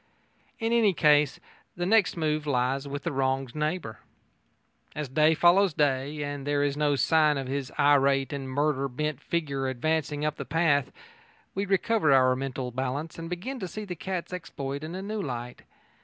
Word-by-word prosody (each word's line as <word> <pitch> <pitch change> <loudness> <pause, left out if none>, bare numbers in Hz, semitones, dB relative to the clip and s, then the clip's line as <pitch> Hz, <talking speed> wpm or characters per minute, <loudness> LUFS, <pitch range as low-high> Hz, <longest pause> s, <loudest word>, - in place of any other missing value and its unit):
In 225 0 -1
any 220 -4 +4
case 150 -2 +4 0.4
the 175 - -2
next 210 -2 +3
move 155 -2 -1
lies 135 +1 0
with 140 0 -5
the - - -2
wronged 135 -2 -1
neighbour. 150 - -3 1.0
As 150 -1 -3
day 155 +5 +3
follows 175 +1 +4
day, 145 +1 0
and 145 -1 -5
there 145 0 +1
is 140 -1 0
no 145 -1 +2
sign 155 +1 +3
of 135 - -3
his 135 0 -3
irate 140 -2 +3
and 135 -2 -5
murder 140 0 0
bent 150 +2 -3
figure 140 -6 -2
advancing 150 +3 -1
up 150 0 -1
the - - -4
path, 145 -4 +1 0.6
we 200 +1 -2
recover 195 -3 +2
our 130 -1 +5
mental 130 -1 -4
balance 135 +6 -4
and 165 0 -6
begin 210 +10 -5
to 185 - -4
see 215 +5 -6
the 180 -3 -5
cat's 185 +1 -5
exploit 140 -5 -5
in 160 +3 -6
a 190 - -5
new 210 +1 -3
light. 125 -5 -5
145 Hz, 175 wpm, -27 LUFS, 135-165 Hz, 1.0 s, our